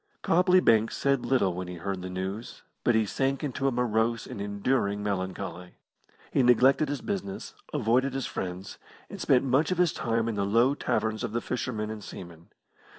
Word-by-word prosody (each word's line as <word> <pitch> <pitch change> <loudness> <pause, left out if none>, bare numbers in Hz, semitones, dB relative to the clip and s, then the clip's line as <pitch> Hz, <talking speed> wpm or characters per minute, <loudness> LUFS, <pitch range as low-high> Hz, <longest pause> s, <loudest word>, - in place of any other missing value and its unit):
Copley 180 +2 +4
Banks 115 -8 +3
said 140 -3 +1
little 120 -8 +2
when 90 +1 -5
he 90 - -6
heard 95 +2 -4
the 95 - -5
news, 95 +5 -5 0.2
but 120 - +3
he 110 -1 +3
sank 135 +7 -1
into 135 -1 -1
a - - +2
morose 115 -2 0
and 100 - -7
enduring 100 0 0
melancholy. 95 -3 -4 0.6
He - - +3
neglected 130 +4 +4
his 145 -1 -3
business, 195 0 -4 0.2
avoided 130 0 +1
his 135 - -2
friends, 90 +1 -5 0.3
and - - -7
spent 125 - +4
much 135 +4 +2
of 185 - 0
his 175 -3 +3
time 115 0 -1
in 115 - -1
the 100 -1 -1
low 115 +7 +3
taverns 110 -5 -1
of 115 -2 -3
the 120 - +1
fishermen 110 -4 -3
and 110 -1 -7
seamen. 85 -3 -10
115 Hz, 185 wpm, -28 LUFS, 100-135 Hz, 0.6 s, Copley